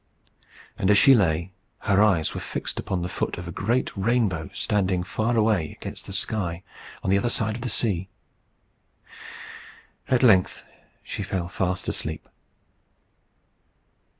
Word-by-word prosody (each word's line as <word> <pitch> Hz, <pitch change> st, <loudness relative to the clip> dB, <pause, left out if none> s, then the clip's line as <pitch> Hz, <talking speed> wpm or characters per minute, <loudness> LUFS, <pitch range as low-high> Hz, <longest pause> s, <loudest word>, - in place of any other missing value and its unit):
And 95 Hz, -, +1 dB
as 105 Hz, -, +6 dB
she 135 Hz, -, +8 dB
lay, 85 Hz, -5 st, +2 dB, 0.3 s
her 100 Hz, 0 st, +3 dB
eyes 95 Hz, -7 st, +3 dB
were -, -, -5 dB
fixed -, -, -4 dB
upon 90 Hz, -2 st, -2 dB
the -, -, -2 dB
foot -, -, -3 dB
of 85 Hz, 0 st, -7 dB
a -, -, -5 dB
great 115 Hz, +9 st, -1 dB
rainbow 100 Hz, -5 st, 0 dB
standing 95 Hz, -3 st, 0 dB
far 110 Hz, +5 st, -1 dB
away 105 Hz, -8 st, +2 dB
against -, -, -8 dB
the -, -, -7 dB
sky 90 Hz, -5 st, -2 dB, 0.4 s
on 95 Hz, -, 0 dB
the 100 Hz, -, +4 dB
other 120 Hz, -, 0 dB
side 110 Hz, -2 st, 0 dB
of 120 Hz, -, -7 dB
the 125 Hz, -, -3 dB
sea. 95 Hz, -5 st, -1 dB, 2.0 s
At 130 Hz, 0 st, +3 dB
length 95 Hz, -7 st, +4 dB, 0.4 s
she -, -, -5 dB
fell 90 Hz, -3 st, -2 dB
fast 90 Hz, 0 st, -2 dB
asleep. 80 Hz, 0 st, -4 dB
95 Hz, 145 wpm, -25 LUFS, 90-110 Hz, 2.0 s, she